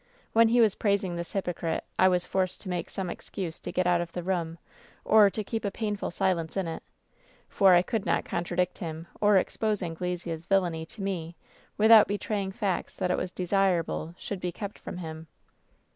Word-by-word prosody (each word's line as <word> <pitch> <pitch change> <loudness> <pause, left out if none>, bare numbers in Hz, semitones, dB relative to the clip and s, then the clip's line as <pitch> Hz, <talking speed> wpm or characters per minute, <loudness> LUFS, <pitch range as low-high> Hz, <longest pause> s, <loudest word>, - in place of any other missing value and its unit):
When 230 0 +6
he 235 +1 +4
was 215 -4 +5
praising 200 -4 0
this 170 0 -5
hypocrite 175 -4 -2 0.2
I 185 - +7
was 180 -1 +2
forced 185 -1 -1
to 190 - -6
make 175 -2 -3
some 190 -2 -4
excuse 175 -1 -5
to - - -6
get 185 - 0
out 175 -1 +3
of 170 -1 -5
the 175 - -4
room, 170 -3 -2 0.5
or 210 -2 +7
to 215 +2 -4
keep 225 +2 -4
a 200 - 0
painful 210 0 -3
silence 170 -1 -1
in 190 -3 0
it, 165 - -5 0.7
for 190 -3 +5
I 175 - +5
could 225 0 -2
not - - 0
contradict 175 +1 -1
him 165 -2 -5
or 205 -1 +5
expose 210 +1 0
Anglesea's 170 -1 -4
villainy 175 -5 +1
to 200 +3 -8
me 175 -4 -3 0.4
without 220 0 +8
betraying 205 -1 -2
facts 195 -1 -2
that 180 - -1
it - - +1
was - - -2
desirable 180 -3 0
should 200 - -5
be 180 -1 -3
kept 200 +3 -7
from - - -7
him. 160 -2 -7
185 Hz, 190 wpm, -28 LUFS, 170-200 Hz, 0.7 s, without